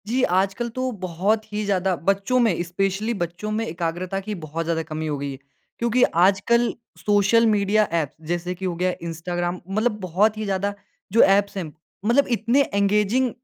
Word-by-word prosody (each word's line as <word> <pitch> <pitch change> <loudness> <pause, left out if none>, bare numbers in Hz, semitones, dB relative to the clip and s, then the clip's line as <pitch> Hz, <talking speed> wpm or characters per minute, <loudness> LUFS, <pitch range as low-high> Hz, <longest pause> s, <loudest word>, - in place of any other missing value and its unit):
जी, 250 +4 +1
आजकल 195 +5 +1
तो 255 0 -1
बहुत 185 +5 0
ही 210 0 -1
ज़्यादा 190 -2 +1
बच्चों 195 +8 +1
में, 220 -9 +2
स्पेशली 195 +5 -1
बच्चों 175 +2 -4
में 220 +1 -1
एकाग्रता 175 +2 -3
की 210 +2 -5
बहुत 165 -1 -4
ज़्यादा 165 0 -1
कमी 160 0 -4
हो 150 -1 -2
गई 140 0 -4
है। 135 - -7 0.4
क्योंकि 235 +1 +2 0.2
आजकल 205 +6 +3 0.2
सोशल 205 +3 +3
मीडिया 210 0 +3 0.2
ऐप 150 -3 -3 0.2
जैसे 175 +1 -1
कि 190 +1 -6
हो 180 -2 -1
गया 180 +1 0
इंस्टाग्राम 175 +2 -3
मतलब 215 +2 0
बहुत 200 +4 +1
ही 215 - -3
ज़्यादा 200 +1 -1 0.4
जो 230 - +6
ऐप्स 200 +1 +4
हैं 190 - -1 0.4
मतलब 250 +5 +3
इतने 235 +5 +2
एंगेजिंग 210 +5 +2
195 Hz, 175 wpm, -23 LUFS, 175-215 Hz, 0.4 s, जो